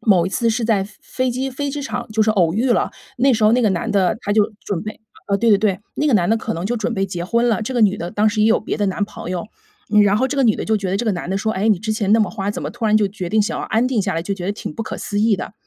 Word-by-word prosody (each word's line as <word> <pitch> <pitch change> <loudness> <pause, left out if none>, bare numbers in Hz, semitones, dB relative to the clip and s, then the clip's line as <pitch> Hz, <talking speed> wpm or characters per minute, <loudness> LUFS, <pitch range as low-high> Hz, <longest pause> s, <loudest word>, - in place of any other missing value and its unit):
某 185 -6 +3
一 - - -1
次 230 +4 0
是 230 +1 -1
在 210 -4 +2 0.2
飞 255 -1 -2
机 260 +2 -2
飞 285 +2 -3
机 290 +1 -4
场 245 -3 -4
就 220 0 +2
是 215 - +2
偶 175 -6 +2
遇 235 +5 +1
了， - - +2 0.3
那 270 +2 +4
时 215 - -1
候 215 - +5
那 250 - +3
个 215 - +4
男 175 - -2
的 195 -1 +2
他 205 - -2
就 210 0 +2
准 195 -5 -2
备 215 +1 -7 0.3
呃， 200 - +2
对 230 +3 +1
对 205 - +7
对， 200 -3 +1 0.2
那 300 - 0
个 280 - +3
男 175 -2 +3
的 225 - +4
可 225 0 -3
能 170 +3 -4
就 240 - -1
准 230 +2 -2
备 195 -1 0
结 175 -2 -4
婚 235 +5 +1
了， 225 -1 +1
这 260 - -4
个 240 - +1
女 205 -2 +4
的 175 +1 -5
当 215 +1 +2
时 210 0 -1
也 215 - +4
有 225 - +4
别 - - -3
的 205 - 0
男 200 +2 0
朋 190 -3 -8
友， 180 +1 -3 0.6
然 205 +1 +3
后 260 - +2
这 275 +2 -4
个 275 - +3
女 220 -4 +3
的 - - -4
就 220 - +1
觉 195 -3 -3
得 195 - 0
这 240 - -2
个 215 - +1
男 175 0 -4
的 195 - 0
说： 220 +2 -1
“哎， 205 +4 0
你 205 -5 +3
之 215 +2 -2
前 210 -1 0
那 225 - +6
么 215 - +2
花， 200 -2 -3
怎 - - -5
么 - - -3
突 240 -1 -6
然 215 0 +4
就 210 -2 +3
决 190 -3 -5
定 215 +3 +2
想 210 - -1
要 - - -3
安 230 +3 +1
定 240 -6 0
下 190 -3 -2
来？” 165 - -1
就 200 +2 -2
觉 180 - -7
得 190 - 0
挺 155 - -7
不 - - -3
可 - - -6
思 205 0 -2
议 215 -2 +3
的。 - - -6
215 Hz, 375 characters per minute, -20 LUFS, 195-230 Hz, 0.6 s, 对